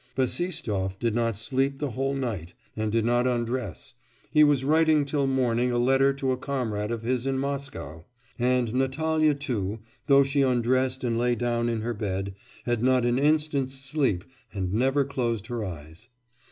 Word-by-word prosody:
Bassistoff 130 - -1
did 115 +1 0
not 115 -1 0
sleep 135 +6 -1
the 145 -2 -3
whole 135 +4 -1
night 110 -11 -4 0.2
and 110 -1 -1
did 115 0 +1
not 120 +1 +2
undress 120 -5 -3 0.4
he 150 - +6
was 145 -3 +3
writing 155 0 +3
till 140 -1 0
morning 125 -2 +1
a 120 - 0
letter 135 +3 +4
to 135 -1 -1
a 130 - 0
comrade 115 -6 -2
of 115 -1 -3
his 125 +2 -1
in 135 0 0
Moscow; 140 - -4 0.4
and 125 -2 +1
Natalya, 155 +4 +1
too, 110 -8 -3 0.3
though 140 -1 +6
she 140 +1 +1
undressed 130 +1 +1
and 115 -2 0
lay 120 0 +2
down 120 -1 0
in 115 -2 -1
her 120 +2 -2
bed, 100 -2 -3 0.3
had 120 -2 0
not 130 -1 +3
an 120 +1 +2
instant's 145 -2 +1
sleep 135 - -1 0.3
and 95 -3 -3
never 135 +5 +2
closed 120 -6 -2
her 120 -1 -4
eyes. 85 +4 -9
125 Hz, 170 wpm, -26 LUFS, 115-135 Hz, 0.4 s, he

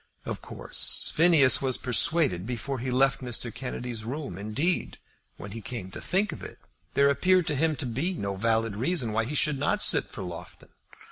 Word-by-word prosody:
Of - - -5
course - - -1
Phineas 160 -5 +5
was 130 -2 +1
persuaded 130 - +3
before 125 +2 -4
he 130 +2 -4
left 135 +1 +2
Mr. 120 -2 -3
Kennedy's 125 -3 -6
room. 135 - -5
Indeed, 110 - -2 0.4
when 100 - -9
he 115 +2 -7
came 95 -4 -6
to - - -8
think 195 +1 0
of 155 - -9
it, - - -10 0.4
there 140 0 +4
appeared 180 +5 +2
to 150 - -1
him 160 +2 +1
to 145 - -4
be 135 +10 -2
no 100 -9 -3
valid 110 +1 0
reason 130 - -1
why 115 +1 0
he 145 +6 -4
should 145 -1 +1
not 145 - 0
sit - - +5
for - - -9
Loughton. 90 -2 -10
130 Hz, 190 wpm, -27 LUFS, 115-150 Hz, 0.4 s, Phineas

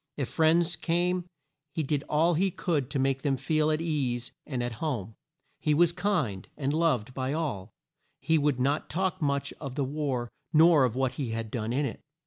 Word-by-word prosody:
If 140 -4 -2
friends 165 +1 +3
came 175 +2 0 0.5
he 160 - 0
did 145 0 -1
all 160 +3 +3
he 190 +4 +2
could 160 -7 -1
to - - -2
make 135 0 +1
them 135 -2 +1
feel 155 +3 +1
at 155 0 +1
ease 130 -7 -1 0.2
and 130 -4 -2
at 120 -1 -3
home. 120 - -2 0.5
He 150 -1 +2
was 170 +2 +5
kind, 170 - -1
and 140 -1 -1
loved 150 -8 +1
by 130 +1 -2
all. 145 - -2 0.5
He 160 -1 +2
would 145 -3 +1
not 140 +4 0
talk 185 +2 -1
much 140 -2 0
of 135 -4 -5
the 140 -2 0
war 130 -4 -2 0.2
nor 160 -3 +6
of 120 -2 -2
what 130 -1 +1
he 135 -5 -3
had 115 -1 -4
done 115 -1 -2
in 140 +4 +1
it. - - -5
145 Hz, 195 wpm, -28 LUFS, 130-160 Hz, 0.5 s, nor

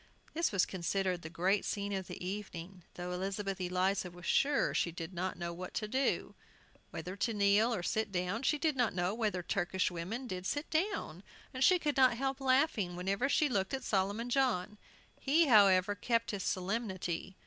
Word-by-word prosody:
This 335 +2 +1
was 195 -3 +3
considered 185 0 -1
the 160 - -7
great 185 +4 +1
scene 200 -1 -2
of 190 -2 -3
the - - -7
evening, 185 -2 -6
though 180 0 -5
Elizabeth 195 +1 -3
Eliza 185 +1 0
was 175 0 -12
sure 285 +8 +2
she 170 - +1
did 165 +2 -7
not 185 +1 -3
know 170 -1 -4
what 180 +1 -8
to 215 - -2
do, 265 +5 0 0.6
whether 185 +1 -6
to 225 +2 -1
kneel 205 +3 +4
or 215 -7 -2
sit 215 +2 -1
down; 180 +4 -1
she 285 +3 +2
did 310 0 0
not 245 -7 +1
know 180 +2 0
whether 215 -5 -1
Turkish 185 0 0
women 185 +10 -4
did 185 -5 -4
sit 290 +2 -2
down, 315 - -1 0.3
and 260 0 0
she 365 +6 +6
could 295 -4 -1
not 255 -3 +5
help 270 +1 -2
laughing 255 - +2
whenever 195 +8 0
she 300 +1 +3
looked 200 -2 0
at 265 - -6
Solomon 205 +5 -1
John. 215 -7 +1 0.4
He, 315 +5 +3
however, 200 -6 +5
kept 230 +3 0
his 200 -2 -3
solemnity. 190 -2 -2
200 Hz, 185 wpm, -33 LUFS, 180-245 Hz, 0.6 s, she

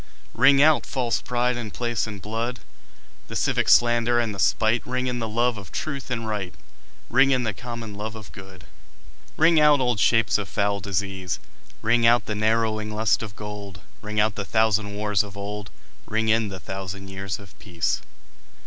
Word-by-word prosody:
Ring 135 +3 +6
out 155 0 +4
false 125 -4 -1
pride 125 0 0
in 115 -3 -4
place 120 +1 -2
and 105 -2 -7
blood, 115 +5 -4 0.7
The - - -8
civic - - +1
slander 120 0 +4
and 115 -3 -1
the 100 - -8
spite; 110 +4 +2
Ring 125 0 -2
in 125 -1 -2
the 115 -1 -3
love 120 0 +1
of 90 -6 -12
truth 140 -3 -4
and 115 -3 -3
right, 105 -4 -3 0.6
Ring 130 +3 +5
in 130 -2 +2
the 110 -2 -1
common 115 0 -7
love 105 +2 -5
of 110 -2 -10
good. 95 -3 -12 0.7
Ring 160 +1 +5
out 150 -1 +6
old 125 -4 +1
shapes 110 -5 +3
of 100 - -5
foul 100 0 0
disease, 95 -2 -2 0.5
Ring 115 +1 +4
out 120 +1 +4
the 105 - -3
narrowing 110 0 0
lust 110 0 +1
of 105 -3 -7
gold; 100 -3 -8 0.2
Ring 105 0 -3
out 105 0 +3
the 100 - -4
thousand 110 -1 +1
wars 105 -2 +1
of 100 -2 -9
old, 100 0 -5 0.4
Ring 110 +1 0
in 110 0 +3
the 95 -2 -7
thousand 95 +1 -6
years 95 0 -4
of 100 -2 -14
peace. 85 -5 -2
110 Hz, 185 wpm, -24 LUFS, 100-120 Hz, 0.7 s, Ring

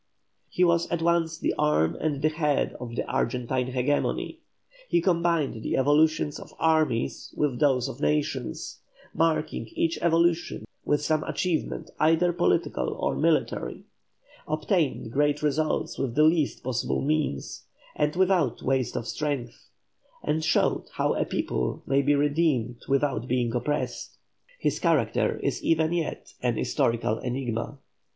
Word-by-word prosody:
He 180 - +1
was 170 -1 +3
at 170 -1 -1
once 165 -1 +1
the - - 0
arm 150 - +2
and 150 -2 -2
the 155 - +4
head 150 -2 0
of 120 -2 -6
the - - -2
Argentine 125 +1 -1
hegemony; 130 +3 -1 0.5
he 345 - +3
combined 170 - +1
the - - -1
evolutions 150 +2 +2
of - - -12
armies 155 - +1
with 140 -5 0
those 135 -5 +3
of - - -8
nations, 75 0 -1 0.3
marking 155 -7 0
each 165 0 0
evolution 170 0 +1 0.2
with 145 0 +1
some 155 0 +1
achievement 175 -4 -2
either 165 +3 +3
political 65 - +1
or 70 -1 0
military; 70 - 0 0.6
obtained 155 - 0
great 145 +3 +1
results 155 +1 0
with 130 -4 -2
the 150 - +5
least 155 -2 +2
possible 125 -1 -1
means, 145 - -2 0.3
and 150 +1 0
without 180 -8 +2
waste 130 -1 0
of 115 - -2
strength; 130 0 -4 0.5
and 155 +1 0
showed - - +2
how - - +1
a - - 0
people 60 0 -2
may 140 0 +2
be 145 +1 +3
redeemed 145 -5 +1
without 135 -3 +1
being 120 -2 0
oppressed. 145 +5 -2 0.4
His - - -1
character - - +1
is - - -1
even 160 0 +2
yet 170 -3 -3
an - - 0
historical 115 -1 0
enigma. 125 +1 -3
145 Hz, 140 wpm, -26 LUFS, 125-160 Hz, 0.6 s, the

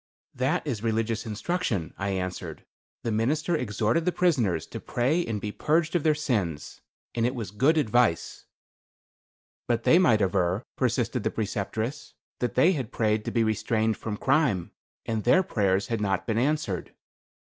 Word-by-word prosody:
"That 130 +5 0
is 125 -9 -3
religious 115 0 -1
instruction;" 110 - -2
I 100 0 -3
answered. 95 -1 -4 0.4
"The 115 - -1
minister 150 +10 +1
exhorted 115 - 0
the 180 - +1
prisoners 125 - +1
to - - -7
pray 145 +9 0
and 110 -6 -3
be 105 +1 -4
purged 155 +8 +1
of 175 - +3
their 155 0 +3
sins. 105 - -2 0.3
And 115 - -1
it 125 +3 +1
was 110 -6 -5
good 135 +10 +3
advice." 120 - +1 1.2
"But 120 -1 0
they 170 - +6
might 115 - +4
aver," 95 +2 +1
persisted 120 -1 0
the - - 0
Preceptress, 110 +6 -3 0.2
"that 125 - -2
they 175 - +5
had 135 - -3
prayed 110 -1 +1
to - - -2
be 115 - +2
restrained 110 +1 +1
from 105 -2 -5
crime, 130 - +1 0.3
and 110 -2 -2
their 185 +10 +5
prayers 100 - 0
had 115 -3 -1
not 95 -2 0
been 115 0 0
answered." 130 - -1
115 Hz, 160 wpm, -27 LUFS, 105-140 Hz, 1.2 s, they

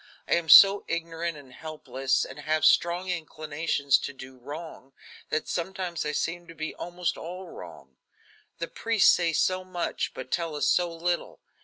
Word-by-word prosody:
I - - +1
am 170 -2 0
so 195 +7 +9
ignorant 165 0 -3
and 135 -3 -14
helpless, 135 -4 -2
and 135 +2 -10
have 155 +2 0
such - - +9
strong 175 +2 -1
inclinations 155 -4 0
to - - -5
do 130 0 -11
wrong 145 0 -9 0.4
that 155 - -1
sometimes 180 -2 -3
I - - -1
seem 170 +3 -3
to 165 - -12
be 155 0 -4
almost 175 0 -3
all 180 +3 -7
wrong. 80 -7 -12 0.6
The 170 - -4
priests 225 0 +3
say 170 -2 +1
so 185 +3 +1
much, 185 -2 -3
but - - -8
tell 165 -3 -1
us 145 - 0
so 175 -1 +2
little. 170 +1 -2
165 Hz, 170 wpm, -27 LUFS, 145-175 Hz, 0.6 s, so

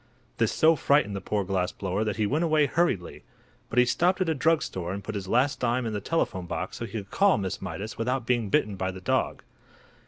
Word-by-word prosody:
This 115 -1 +2
so 160 +1 +4
frightened 140 -9 +2
the 95 - -4
poor 105 +1 -1
glass 90 -1 -1
blower 95 +2 -2
that 105 -2 -2
he 110 - 0
went 150 +10 0
away 155 -3 +3
hurriedly. 145 - -1 0.5
But 115 - -6
he 125 - +7
stopped 180 +9 +2
at 185 -3 +1
a - - +2
drug 160 +2 +2
store 90 -1 -4
and 100 +1 -6
put 110 - -5
his 100 -2 -5
last 125 +7 +2
dime 125 0 0
in 110 - -2
the 105 - -3
telephone 95 - -1
box 90 +2 -4
so 115 - -4
he 110 - -11
could 100 -3 -5
talk 200 -1 +4
to - - -2
Miss 95 - -4
Mydas 105 +2 -6
without 125 +1 -1
being 120 -4 0
bitten 100 +1 +1
by 95 0 -1
the 95 0 -6
dog. - - -1
110 Hz, 245 wpm, -27 LUFS, 95-145 Hz, 0.5 s, he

